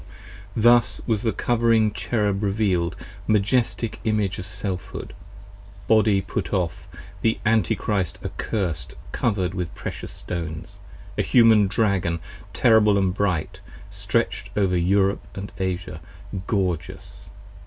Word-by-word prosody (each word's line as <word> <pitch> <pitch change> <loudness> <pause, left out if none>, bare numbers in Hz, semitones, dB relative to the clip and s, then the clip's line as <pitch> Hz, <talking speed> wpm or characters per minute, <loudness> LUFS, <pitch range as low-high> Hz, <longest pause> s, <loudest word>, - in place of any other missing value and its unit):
Thus 120 +1 +4
was 110 -4 +1
the 115 - +1
Covering 115 -2 +2
Cherub 100 0 0
reveal'd, 95 -5 +1 0.3
majestic 110 +1 +1
image 105 -3 0
10 - - -7
Of 90 - -5
Selfhood, 95 -1 -5 0.7
Body 105 -3 +4
put - - -4
off, 90 -5 -2 0.3
the 110 0 +2
Antichrist 105 -3 +1
accursed, 80 - -2 0.2
Cover'd 95 -6 0
with 90 -3 -4
precious - - -6
stones, 80 -3 -6 0.4
a - - +5
"Human 110 -4 +5
Dragon 95 -4 +1 0.3
terrible 105 -3 +5
And 95 -2 +2
bright, 95 -6 -1 0.3
stretch'd - - -1
over 95 -3 +2
Europe 95 +3 +2 0.4
& - - -16
Asia 90 -4 -3 0.5
gorgeous. 90 -5 -3
100 Hz, 110 wpm, -24 LUFS, 90-110 Hz, 0.7 s, a